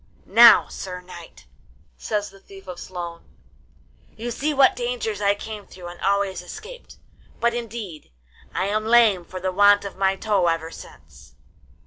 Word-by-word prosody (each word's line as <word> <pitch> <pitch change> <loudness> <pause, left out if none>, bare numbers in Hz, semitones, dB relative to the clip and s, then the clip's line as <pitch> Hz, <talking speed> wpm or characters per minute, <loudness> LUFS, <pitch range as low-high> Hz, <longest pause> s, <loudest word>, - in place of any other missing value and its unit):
Now, 235 +4 +7
sir 180 -1 -7
knight,' 175 -2 -13 0.5
says 205 -2 -3
the 195 - -17
Thief 195 0 -15
of 180 -1 -7
Sloan, 170 -2 -7 0.9
'you 235 +2 -4
see 295 +6 -1
what 275 -2 +4
dangers 240 -4 -3
I 200 0 +3
came 210 -1 -8
through 180 -2 -10
and 175 - -12
always 200 -1 0
escaped; 475 - -11 0.4
but, 235 0 +2
indeed, 225 -8 -7 0.4
I 185 - -1
am 215 +2 -1
lame 225 -6 +5
for 185 +2 -8
the 185 +1 -2
want 205 +2 +5
of 195 - -7
my 195 0 +2
toe 195 -3 +1
ever 165 -1 -1
since. 65 - -15
200 Hz, 155 wpm, -23 LUFS, 180-225 Hz, 0.9 s, Now